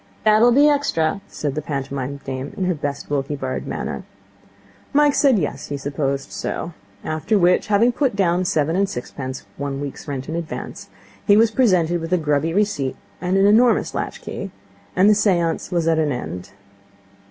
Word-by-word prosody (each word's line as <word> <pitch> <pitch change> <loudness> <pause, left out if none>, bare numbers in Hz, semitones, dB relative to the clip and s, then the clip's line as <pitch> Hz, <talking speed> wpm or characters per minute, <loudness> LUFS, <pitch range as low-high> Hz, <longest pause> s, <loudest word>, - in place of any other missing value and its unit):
'That'll 215 +3 +5
be 285 +4 +6
extra,' 200 - +1
said 145 -3 -3
the 155 - -3
pantomime 140 -1 -4
dame 135 +1 -5
in 190 - -1
her 180 - +1
best 145 -2 -4
Wilkie 140 0 -1
Bard 130 -2 -4
manner. - - -4 0.9
Mike 295 0 +4
said 275 -6 +4
yes, 155 -6 -3
he 145 - -3
supposed 140 -1 -2
so. 170 - -4 0.3
After 155 +7 0
which, 180 -1 +3
having 215 +4 +4
put 260 -3 0
down 180 -2 +2
seven 160 -1 +1
and 195 +1 +1
sixpence, 130 +1 -6
one 140 -1 -3
week's 140 +1 -6
rent 135 -2 -4
in 160 - -4
advance, 170 -2 -6 0.4
he 205 -1 +6
was 225 0 +5
presented 180 -9 +2
with 165 +1 -5
a 180 - +4
grubby 150 0 0
receipt 185 -9 0 0.3
and 180 +1 +1
an 195 - +4
enormous 230 +4 +4
latchkey, - - -5 0.5
and 185 +2 +5
the 210 - +7
seance 175 -6 +1
was 170 -2 0
at 165 -1 +3
an 150 -2 +1
end. 95 -7 -5
165 Hz, 175 wpm, -21 LUFS, 140-205 Hz, 0.9 s, the